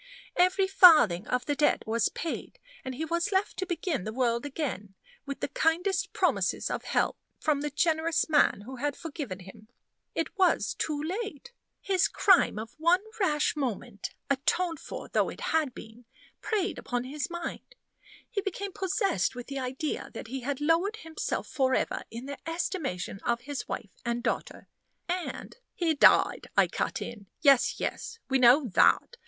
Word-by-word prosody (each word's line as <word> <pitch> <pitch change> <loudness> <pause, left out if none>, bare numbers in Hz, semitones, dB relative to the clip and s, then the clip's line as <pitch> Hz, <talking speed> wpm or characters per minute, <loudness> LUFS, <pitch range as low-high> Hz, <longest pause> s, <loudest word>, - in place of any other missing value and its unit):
Every 370 +2 +4
farthing 300 - +7
of 250 0 -1
the 290 - 0
debt 295 - +2
was 225 0 +1
paid; 330 - -5 0.3
and 260 -1 -5
he 315 +5 -3
was 340 +5 -1
left 385 +1 +1
to 375 - -2
begin 340 - -2
the 215 - -4
world 235 +2 0
again, 245 - -4 0.3
with 280 - -5
the - - 0
kindest 345 +7 0
promises - - 0
of - - -3
help - - 0 0.2
from 300 -2 +1
the 295 - -2
generous 320 +2 +1
man 295 -9 +3
who 260 +5 -9
had 290 +2 -1
forgiven 285 - -6
him. 210 +4 -13 0.5
It 325 - -2
was 370 - +3
too 300 -2 -2
late. 380 - -4 0.3
His 380 -2 +2
crime 380 - +4
of 220 +2 -6
one 340 +4 +4 0.2
rash 300 -7 +2
moment 240 -6 -4
atoned 315 +4 0
for - - -7
though - - +1
it - - -9
had 310 -4 +2
been 225 +2 -12 0.4
preyed 415 -3 -1
upon 245 0 -2
his 290 +6 -4
mind. 345 +8 -6 0.5
He 425 -5 -2
became 395 0 -4
possessed 385 - 0
with 245 -1 -6
the 275 -1 -5
idea 265 +4 -3
that 220 - -7
he 265 +2 -3
had 270 +2 -3
lowered 330 +8 +2
himself 325 -7 -4
forever 260 -2 0
in 235 +3 -7
the 280 0 -6
estimation 310 - -3
of 235 +2 -1
his 280 +1 -5
wife 205 - -5
and 235 0 -2
daughter, - - -3 0.4
and 360 +5 -4
" - - -55
"He 335 -3 +1
died," 290 - +5
I - - +7
cut - - -2
in. 210 -4 -9
"Yes, 275 -4 +4
yes, 460 - -4
we 265 0 +3
know 255 +4 +6
that. 475 - +3
295 Hz, 170 wpm, -28 LUFS, 245-350 Hz, 0.5 s, farthing